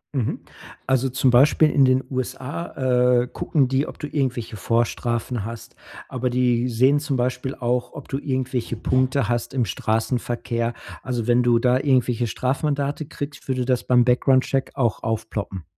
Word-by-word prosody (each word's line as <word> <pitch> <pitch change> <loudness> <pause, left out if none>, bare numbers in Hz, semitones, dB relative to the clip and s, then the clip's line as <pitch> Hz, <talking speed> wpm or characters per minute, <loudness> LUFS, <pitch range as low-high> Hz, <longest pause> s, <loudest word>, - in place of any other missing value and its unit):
Mhm, 125 -5 -1 0.4
also, 130 0 +1
zum 130 0 +2
Beispiel 150 +4 +5
in 140 -2 +5
den 130 +1 +3
USA, 130 -1 0
äh, - - -6
gucken 135 0 0
die, 135 +2 0
ob - - -9
du 150 - -5
irgendwelche 125 -6 -2
Vorstrafen 120 +1 -1
hast. 115 +1 -8 0.3
Aber 125 0 -2
die 125 0 +1
sehen 130 +5 +3
zum 140 -3 -2
Beispiel 125 +2 -2
auch, 125 0 -1
ob 145 - -9
du 135 - -2
irgendwelche 130 -4 -2
Punkte 130 +2 +1
hast 120 +1 -2
im 125 -3 +2
Straßenverkehr. 115 +1 -1 0.3
Also, 120 -3 -3
wenn 120 0 +3
du 120 -1 +3
da 125 +1 +3
irgendwelche 125 -4 +1
Strafmandate 140 +4 -1
kriegst, 145 -1 -7
würde 130 -2 -1
das 125 -1 0
beim 125 -1 +4
Background 130 +1 +3
Check 135 -1 -1
auch 120 -5 0
aufploppen. 105 -5 -4
125 Hz, 160 wpm, -23 LUFS, 120-135 Hz, 0.4 s, Beispiel